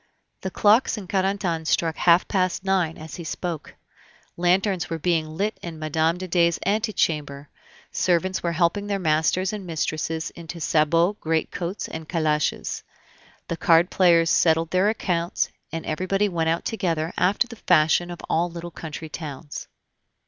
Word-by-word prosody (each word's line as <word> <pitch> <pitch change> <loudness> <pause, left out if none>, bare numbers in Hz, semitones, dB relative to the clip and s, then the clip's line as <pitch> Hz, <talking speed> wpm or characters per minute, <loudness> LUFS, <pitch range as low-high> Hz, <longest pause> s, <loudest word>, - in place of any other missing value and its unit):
The 190 - -3
clocks 215 +5 +3
in 200 -3 -7
Carentan 190 -4 -1
struck 165 0 +1
half 170 0 +4
past 185 -1 0
nine 185 -4 +1
as 155 0 -9
he 170 - -6
spoke. 165 0 -5 0.6
Lanterns 180 +1 +1
were 165 - -2
being 160 -1 0
lit 210 +3 -1
in 170 -2 -7
Mme. 160 +2 0
de 185 +1 -5
Dey's 170 -1 +3
antechamber, 155 -9 -1 0.4
servants 185 +1 +1
were 170 -1 -1
helping 175 +4 +1
their 200 -1 0
masters 170 +3 +1
and 210 -2 -5
mistresses 160 -1 -2
into 170 0 -9
sabots, 165 +5 +2
greatcoats, 165 +3 -2
and 160 -1 -8
calashes. 155 -3 0 0.7
The 170 - -3
card 170 +2 +4
players 170 -3 +4
settled 165 0 +3
their 185 +3 +3
accounts, 175 -5 -1 0.2
and 165 -1 -5
everybody 185 +6 0
went 165 -4 0
out 165 +1 -1
together, 170 -7 -1
after 195 +5 +2
the 240 - -10
fashion 175 +1 +4
of 175 - -7
all 170 +2 +1
little 170 0 -7
country 160 0 -7
towns. 150 -2 -7
170 Hz, 150 wpm, -24 LUFS, 160-185 Hz, 0.7 s, half